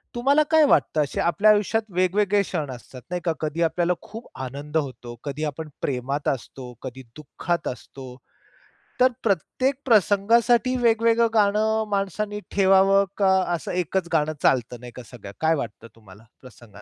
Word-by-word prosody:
तुम्हाला 280 +5 +3
काय 320 -1 +6
वाटतं? 155 - +2
असे 145 - -3
आपल्या 205 +5 +4
आयुष्यात 210 +2 +1
वेगवेगळे 200 +3 +2
क्षण 155 -8 -4
असतात, 125 +1 -11
नाही 180 -1 -3
का? 165 - +2
कधी 155 +2 -2
आपल्याला 170 +2 +1
खूप 225 +2 -10
आनंद 140 +4 -4
होतो, 125 -5 -5
कधी 145 +1 -5
आपण 155 +1 -4
प्रेमात 135 +2 -3
असतो, 130 -1 -6
कधी 130 0 -8
दुःखात 170 +3 -4
असतो. 130 0 -8 0.9
तर 255 0 +6
प्रत्येक 230 - 0
प्रसंगासाठी 230 +3 +3
वेगवेगळं 230 0 +3
गाणं 215 +1 +2
माणसानी 205 +1 -2
ठेवावं, 195 0 +4
का 195 -2 +3 0.2
असं 165 - -6
एकच 180 0 -2
गाणं 155 -1 +1
चालत 125 -1 +2
नाही 120 0 -10
का 125 - -9
सगळं? 100 -5 -10
काय 160 0 +3
वाटतं 115 -5 -6
तुम्हाला 105 -2 -17 0.2
प्रसंगान 115 -5 -15
170 Hz, 150 wpm, -23 LUFS, 135-210 Hz, 0.9 s, काय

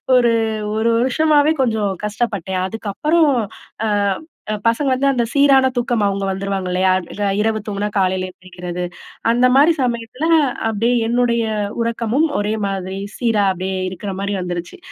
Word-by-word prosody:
ஒரு 240 -2 +4 0.5
1 225 +1 +2
வருஷமவே 295 +4 +3
கொஞ்சம் 220 -5 +1
கஷ்டப்பட்டேன். 205 -4 -2
அதுக்கப்பறம், 290 - +1 0.5
அ - - +1 0.6
அ - - 0
பசங்க 250 +5 +2
வந்து 265 +2 +1
அந்த 245 -3 +1
சீரான 280 -2 +5
தூக்கம் 240 -2 0
அவுங்க 200 0 -1
வந்துருவாங்கல்லையா? 190 -1 0 0.3
ரா 205 -1 +1
இரவு 220 +1 +1
தூங்குனா 205 0 -2
காலைல 185 -1 +1
எந்திரிக்கிறது, 180 -1 -7 0.5
அந்த 245 +2 +3
மாரி 295 +5 +6
சமயத்துல, 240 +3 -2 0.4
அப்டியே 225 +3 +1
என்னுடைய 235 -1 +1 0.4
உறக்கமும் 230 +6 +1
ஒரே 205 +1 -1
மாதிரி 190 0 -4 0.2
சீரா 225 -4 +1
அப்டியே 185 +1 -3
இருக்குற 190 +2 -6
மாரி 200 0 -2
வந்துருச்சு. 175 - -5
220 Hz, 135 wpm, -19 LUFS, 195-245 Hz, 0.6 s, மாரி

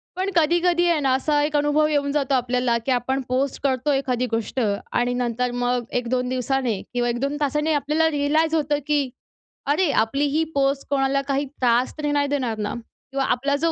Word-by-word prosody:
पण 380 +2 -1
कधी-कधी 345 +2 +3
आहे 325 -3 +2
ना 265 -2 +2
असा 290 +2 +1
एक 300 0 -1
अनुभव 295 +1 +2
येऊन 285 -2 0
जातो 280 -2 0
आपल्याला, 250 -1 +1
की 265 - 0
आपण 260 +2 0
पोस्ट 265 +2 -1
करतो 265 +1 +1
एखादी 255 -2 0
गोष्ट. 225 +3 -2 0.3
आणि 245 0 +1
नंतर 245 0 -1
मग 245 0 0 0.2
1-2 250 +1 -1
दिवसाने 255 -4 -1
किंवा 240 0 0
1-2 275 +5 -1
तासांनी 300 +2 0
आपल्याला 300 +3 +1
रीअलाइज 310 +3 +1
होतं, 295 -1 +1
की 290 -3 +1 0.6
अरे, 305 +3 +2
आपली 275 +6 +1
ही 310 +3 +1
पोस्ट 275 0 +1
कोणाला 275 0 +1
काही 280 +1 0
त्रास 250 -2 +1
तरी 295 -1 -1
नाही 285 -1 +1
देणार 255 -6 -1
ना 210 -1 -3
किंवा 270 +3 -6
आपला 280 +3 -1
जो 325 +3 +1
275 Hz, 185 wpm, -23 LUFS, 250-295 Hz, 0.6 s, कधी-कधी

